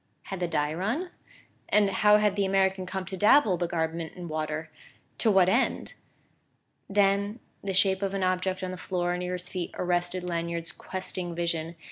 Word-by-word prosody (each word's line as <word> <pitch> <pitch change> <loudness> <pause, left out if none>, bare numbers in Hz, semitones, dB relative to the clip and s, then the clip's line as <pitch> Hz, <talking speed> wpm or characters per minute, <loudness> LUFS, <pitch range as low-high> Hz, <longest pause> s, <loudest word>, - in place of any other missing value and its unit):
Had 195 - -6
the 175 - 0
dye 150 -2 0
run? 235 - -2 0.6
And 205 -2 +4
how 210 +2 +5
had 210 -2 +2
the 200 - +1
American 190 -1 +1
come 190 0 -4
to 190 - -6
dabble 210 0 +5
the 175 0 -1
garment 165 -1 -2
in 175 -1 -7
water 155 0 -3 0.5
to 225 - +4
what 190 -3 +5
end? 235 +8 +1 1.0
Then 200 +2 +2 0.2
the 195 -1 -2
shape 190 0 +3
of 195 0 -1
an 195 - -1
object 185 0 0
on 185 - -2
the 185 - -6
floor 175 -1 -1
near 180 0 -3
his 180 0 -4
feet 180 -3 -4
arrested 175 0 0
Lanyard's 170 -1 -3
questing 185 -2 -4
vision. 170 -1 -2
185 Hz, 175 wpm, -28 LUFS, 175-195 Hz, 1.0 s, how